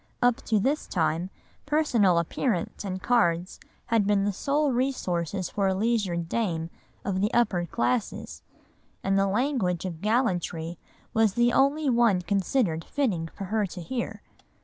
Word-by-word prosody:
Up 245 Hz, -1 st, +3 dB
to 220 Hz, -2 st, +2 dB
this 280 Hz, +9 st, 0 dB
time, 165 Hz, +1 st, 0 dB, 0.4 s
personal 245 Hz, -, +3 dB
appearance 175 Hz, +4 st, -1 dB
and 185 Hz, -2 st, -4 dB
cards 180 Hz, -7 st, +1 dB, 0.3 s
had 225 Hz, -4 st, +2 dB
been 205 Hz, -1 st, +3 dB
the 205 Hz, 0 st, 0 dB
sole 285 Hz, +7 st, +1 dB
resources 190 Hz, -, -1 dB
for 200 Hz, -2 st, +1 dB
a 190 Hz, -, +1 dB
leisured 195 Hz, -6 st, 0 dB
dame 170 Hz, -6 st, -1 dB, 0.3 s
of 190 Hz, -2 st, -1 dB
the 210 Hz, -, +1 dB
upper 200 Hz, -8 st, +2 dB
classes, 120 Hz, -4 st, -2 dB, 0.6 s
and 195 Hz, 0 st, +1 dB
the 195 Hz, 0 st, +3 dB
language 200 Hz, -, 0 dB
of 170 Hz, -3 st, -5 dB
gallantry 175 Hz, -7 st, 0 dB, 0.3 s
was 220 Hz, -3 st, +3 dB
the 240 Hz, 0 st, +3 dB
only 285 Hz, +3 st, +3 dB
one 235 Hz, -7 st, +3 dB
considered 190 Hz, -2 st, 0 dB
fitting 205 Hz, -, -1 dB
for 195 Hz, -, -9 dB
her 215 Hz, -2 st, +2 dB
to 180 Hz, -, -9 dB
hear. 235 Hz, +8 st, -4 dB
200 Hz, 150 wpm, -27 LUFS, 175-240 Hz, 0.6 s, Up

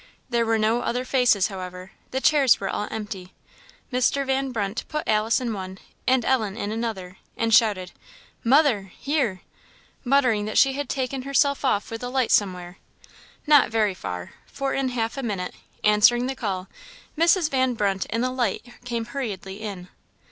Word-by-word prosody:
There 235 Hz, -1 st, +1 dB
were 225 Hz, 0 st, +2 dB
no 220 Hz, +2 st, +2 dB
other 250 Hz, +2 st, -2 dB
faces, 245 Hz, -7 st, +3 dB
however; 185 Hz, -1 st, -8 dB, 0.2 s
the 265 Hz, -, -2 dB
chairs 275 Hz, -2 st, +4 dB
were 195 Hz, -, -3 dB
all 210 Hz, -, -2 dB
empty. 200 Hz, -4 st, -6 dB, 0.6 s
Mr. 255 Hz, +2 st, +2 dB
Van 270 Hz, 0 st, 0 dB
Brunt 205 Hz, -2 st, -2 dB
put 305 Hz, -1 st, -4 dB
Alice 215 Hz, +1 st, +2 dB
in 240 Hz, -3 st, -2 dB
one 190 Hz, -2 st, -6 dB, 0.3 s
and 255 Hz, -2 st, +3 dB
Ellen 220 Hz, -6 st, +1 dB
in 205 Hz, -2 st, -3 dB
another, 215 Hz, -5 st, -4 dB, 0.2 s
and 230 Hz, 0 st, 0 dB
shouted, 205 Hz, -5 st, +3 dB, 0.5 s
"Mother! 240 Hz, -7 st, +3 dB
here!" 265 Hz, -, -1 dB, 0.6 s
muttering 250 Hz, -6 st, +2 dB
that 215 Hz, -, -3 dB
she 270 Hz, -1 st, +5 dB
had 285 Hz, +1 st, -4 dB
taken 265 Hz, 0 st, -2 dB
herself 280 Hz, +1 st, +1 dB
off 220 Hz, -6 st, 0 dB
with 225 Hz, -, -5 dB
the 245 Hz, -, -4 dB
light 255 Hz, -2 st, 0 dB
somewhere. 180 Hz, -2 st, 0 dB, 0.7 s
Not 295 Hz, -5 st, +6 dB
very 215 Hz, -3 st, +1 dB
far: 90 Hz, -, -6 dB, 0.2 s
for 275 Hz, -1 st, -3 dB
in 270 Hz, -1 st, 0 dB
half 230 Hz, 0 st, -2 dB
a -, -, -2 dB
minute, 200 Hz, -7 st, -3 dB, 0.3 s
answering 210 Hz, +4 st, +5 dB
the 265 Hz, -, -2 dB
call, 195 Hz, -7 st, -3 dB, 0.5 s
Mrs. 335 Hz, 0 st, +3 dB
Van 260 Hz, -2 st, +1 dB
Brunt 195 Hz, -3 st, 0 dB
and 230 Hz, +2 st, -1 dB
the 255 Hz, -, 0 dB
light 245 Hz, -4 st, -1 dB, 0.2 s
came 235 Hz, -2 st, -3 dB
hurriedly 205 Hz, -7 st, -5 dB
in. 195 Hz, -4 st, -6 dB
230 Hz, 170 wpm, -24 LUFS, 200-260 Hz, 0.7 s, Not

